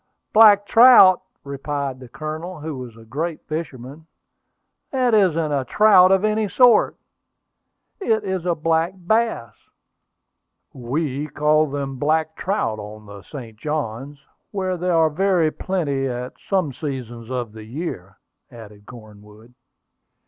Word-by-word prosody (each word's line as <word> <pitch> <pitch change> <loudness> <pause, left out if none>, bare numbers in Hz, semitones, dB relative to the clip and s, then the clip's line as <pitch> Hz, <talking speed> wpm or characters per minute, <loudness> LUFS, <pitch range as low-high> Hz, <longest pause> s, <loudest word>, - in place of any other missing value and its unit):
"Black 210 -2 +7
trout!" 225 -6 +7 0.2
replied 140 -1 -4
the 130 -2 -12
Colonel, 155 +6 -7
who 155 -1 -5
was 125 -3 -9
a 115 - -15
great 155 +7 -4
fisherman. 155 -1 -7 0.8
"That 255 -3 0
isn't 165 -7 +2
a 140 -2 0
trout 190 - +5
of 195 +2 +3
any 215 -1 0
sort! 245 0 +4 1.0
It 220 - 0
is 190 -3 -3
a 175 - +1
black 165 +3 0
bass." 190 - -1 1.2
"We 140 +3 -3
call 150 +1 +1
them 135 -1 -4
black 155 +2 0
trout 180 - -2
on 105 +1 -10
the 100 -1 -11
St. 115 -3 -10
Johns, 140 0 -5 0.3
where 185 -2 -2
they 180 +1 -3
are 165 -2 +3
very 180 -1 +1
plenty 145 -9 -2
at 125 0 -5 0.2
some 185 -8 0
seasons 120 -6 -7
of 125 -4 -4
the 110 0 -11
year," 110 - -7 0.3
added 105 -3 -14
Cornwood. 110 0 -15
150 Hz, 130 wpm, -21 LUFS, 125-185 Hz, 1.2 s, Black